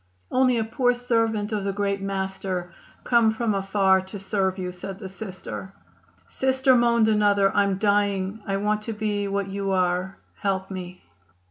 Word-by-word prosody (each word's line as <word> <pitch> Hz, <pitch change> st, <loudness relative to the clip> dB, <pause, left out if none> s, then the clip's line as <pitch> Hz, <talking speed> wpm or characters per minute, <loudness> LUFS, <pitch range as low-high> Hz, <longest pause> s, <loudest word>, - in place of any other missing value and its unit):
"Only 255 Hz, -1 st, +3 dB
a 225 Hz, -, +1 dB
poor 245 Hz, +2 st, +1 dB
servant 225 Hz, -3 st, 0 dB
of 210 Hz, -2 st, -1 dB
the 195 Hz, 0 st, -1 dB
Great 200 Hz, 0 st, -1 dB
Master, 190 Hz, -2 st, -3 dB, 0.3 s
come 235 Hz, -2 st, +4 dB
from 220 Hz, 0 st, -1 dB
afar 195 Hz, -1 st, +3 dB
to 190 Hz, +2 st, -8 dB
serve 195 Hz, -1 st, -1 dB
you," 180 Hz, -1 st, -3 dB
said 185 Hz, +2 st, -7 dB
the 195 Hz, -1 st, -7 dB
Sister. 185 Hz, -, -7 dB, 0.5 s
"Sister," 265 Hz, 0 st, +2 dB
moaned 235 Hz, -2 st, +4 dB
another, 205 Hz, -2 st, +3 dB
"I'm 200 Hz, -2 st, +2 dB
dying. 200 Hz, 0 st, +1 dB
I 195 Hz, 0 st, 0 dB
want 210 Hz, +1 st, 0 dB
to 225 Hz, +1 st, -5 dB
be 210 Hz, -1 st, -1 dB
what 200 Hz, 0 st, -1 dB
you 195 Hz, 0 st, -3 dB
are; 185 Hz, +1 st, 0 dB, 0.2 s
help 195 Hz, -1 st, -1 dB
me." 180 Hz, -1 st, -7 dB
200 Hz, 160 wpm, -25 LUFS, 190-220 Hz, 0.5 s, come